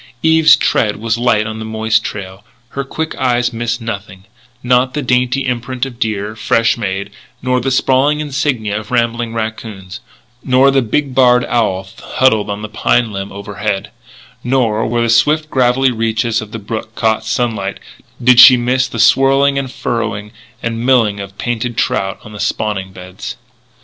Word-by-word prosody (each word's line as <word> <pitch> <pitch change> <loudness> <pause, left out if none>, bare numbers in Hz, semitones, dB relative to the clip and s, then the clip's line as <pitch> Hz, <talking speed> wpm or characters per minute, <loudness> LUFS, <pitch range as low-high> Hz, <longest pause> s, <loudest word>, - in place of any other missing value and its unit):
Eve's 160 0 +6
tread 105 -4 +1
was 115 +2 -2
light 115 -3 +2
on 110 +1 -5
the - - -5
moist 110 0 0
trail; 95 -1 -7 0.3
her 140 - -4
quick 160 +3 -4
eyes 125 -2 +1
missed 115 +1 -2
nothing 100 -4 -7 0.4
not 125 +2 +2
the 150 - -1
dainty 125 +2 +1
imprint 125 +1 -2
of 125 -3 -10
deer, 105 -1 -2
fresh 115 +1 +1
made, 100 -3 -4 0.3
nor 125 0 +1
the 135 - -1
sprawling 135 +3 +2
insignia 135 -8 -1
of 110 - -11
rambling 120 -1 0
raccoons 110 -4 -5 0.4
nor 130 +2 +4
the 135 0 +3
big 130 +4 -1
barred 125 -1 +4
owl 95 -6 -1
huddled 110 -6 +1
on 105 +1 -4
a - - -5
pine 115 +1 +1
limb 100 0 -5
overhead, 100 0 -4 0.5
nor, 120 -4 +1
where 120 +1 0
the - - +1
swift 150 +7 +2
gravelly 130 0 +2
reaches 115 0 -1
of 110 -1 -9
the 115 - -5
brook 110 +1 -6
caught 110 -1 0
sunlight, 110 -3 -2 0.4
did 125 0 +5
she 125 0 +10
miss 125 +2 +1
the 120 - -7
swirl 135 +5 +4
and 140 -2 0
furrowing 105 -5 -3 0.3
and 115 0 -3
milling 115 -6 +2
of 100 0 -8
painted 120 0 -3
trout 95 0 -1
on 105 - -12
the 105 - -9
spawning 95 -4 -2
beds. 95 +6 -9
115 Hz, 165 wpm, -15 LUFS, 105-125 Hz, 0.5 s, she